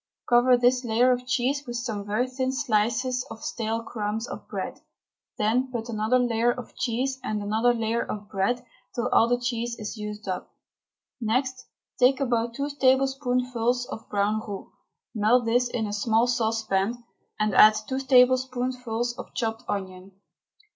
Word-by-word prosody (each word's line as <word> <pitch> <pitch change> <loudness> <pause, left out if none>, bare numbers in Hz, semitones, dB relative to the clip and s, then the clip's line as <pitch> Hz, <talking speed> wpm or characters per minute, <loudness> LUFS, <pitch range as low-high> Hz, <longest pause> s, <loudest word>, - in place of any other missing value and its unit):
Cover 245 +1 +5
this 250 +1 +3
layer 240 +2 +3
of 250 0 -1
cheese 265 +2 0
with 240 - -5
some 220 -4 -4
very 215 +5 0
thin 260 0 -2
slices 250 -1 0
of 220 - -9
stale 225 0 -2
crumb 215 -2 -3
of - - -8
bread. - - -5 0.6
Then 245 +5 +1
put 235 -1 -4
another 220 +2 +1
layer 240 -1 +2
of 250 -1 -8
cheese 260 +2 -1
and 215 -1 -2
another 220 +4 +2
layer 230 0 0
of 205 -1 -6
bread 215 +6 -1 0.3
till 245 +1 -1
all 230 - +5
the 245 +1 +2
cheese 235 -1 -2
is 215 +1 -6
used 210 -1 -6
up. 185 - -5 0.7
Next 255 +3 -1 0.3
take 260 +2 +5
about 235 -3 0
two 285 +2 -2
tablespoonfuls 255 -3 +1
of 220 - -8
brown 205 +1 +1
roux, 200 -2 -7 0.4
melt 230 +2 +3
this 245 +2 +2
in 230 -2 -2
a 205 - -4
small 225 +2 +2
saucepan, 225 -2 0 0.4
and 215 -1 +1
add 215 0 +8
two 265 0 -2
tablespoonfuls 250 -2 +2
of - - -9
chopped 225 +1 -2
onion. 190 -1 -5
240 Hz, 155 wpm, -26 LUFS, 220-250 Hz, 0.7 s, add